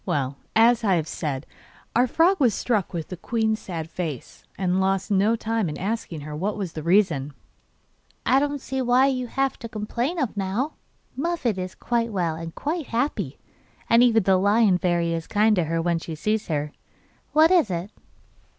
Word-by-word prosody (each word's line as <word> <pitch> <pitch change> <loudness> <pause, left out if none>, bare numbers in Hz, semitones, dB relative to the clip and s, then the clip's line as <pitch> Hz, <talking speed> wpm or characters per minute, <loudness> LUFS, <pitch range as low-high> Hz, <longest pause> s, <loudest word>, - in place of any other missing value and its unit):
Well, 140 -6 -1 0.2
as 230 +1 +5
I 195 -4 +3
have 160 -2 -1
said, 145 -4 -4 0.5
our 245 +2 +4
frog 345 +9 +3
was 240 -8 +3
struck 215 -7 0
with 165 -3 -5
the 180 - -6
queen's 220 +3 0
sad 165 -4 -5
face, 165 -6 -6
and 185 0 +1
lost 195 +2 0
no 205 +3 +3
time 225 -4 -1
in 150 - -5
asking 195 -5 -3
her 150 +1 -7
what 200 +7 -2
was 190 -5 -4
the 155 - -5
reason. 165 -5 +2 0.9
'I 265 - +4
don't 285 -1 -1
see 265 0 -3
what 255 +2 +4
you 255 -1 -3
have 270 +3 -1
to 230 - -7
complain 235 +9 -2
of 265 -9 -1
now; 205 +10 -1 0.4
Muffette 270 - -1
is 185 0 -5
quite 235 -1 -1
well 175 -5 0
and 165 0 -7
quite 310 0 -3
happy, 245 +5 -2 0.5
and 230 +1 +7
even 230 -3 +4
the 190 0 +4
Lion 200 -1 +3
Fairy 170 -2 +1
is 165 -1 -4
kind 215 +1 +3
to 175 -4 +1
her 165 +1 -1
when 170 0 0
she 165 0 -6
sees 215 +7 -1
her. 150 -2 -2 0.6
What 315 +3 +6
is 345 - +4
it? 180 +3 -3
205 Hz, 185 wpm, -24 LUFS, 170-240 Hz, 0.9 s, and